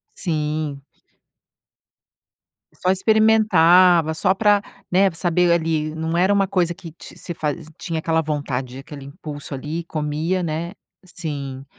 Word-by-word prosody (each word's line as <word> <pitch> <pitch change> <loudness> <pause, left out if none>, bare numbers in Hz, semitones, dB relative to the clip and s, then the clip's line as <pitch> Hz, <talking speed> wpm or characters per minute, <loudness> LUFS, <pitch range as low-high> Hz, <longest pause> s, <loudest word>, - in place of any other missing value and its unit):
Sim 150 -4 -2 1.9
Só 185 - -1
experimentava, 185 -5 +5
só 185 +4 +2
pra 205 0 +3 0.3
né, 190 +1 +4
saber 175 +1 +1
ali, 160 -2 0
não 160 +1 -2
era 190 +3 +3
uma 200 -1 +3
coisa 175 -3 0
que 170 -4 -11
ti - - -13
se 175 - -6
fazi 150 -2 -3
tinha 165 -3 -3
aquela 160 0 +1
vontade, 135 -4 -3
aquele 140 0 -10
impulso 145 0 -8
ali, 155 +5 -4
comia, 155 +4 -2
né. 165 +2 -3 0.3
Sim. 140 -7 -6
165 Hz, 125 wpm, -21 LUFS, 150-180 Hz, 1.9 s, experimentava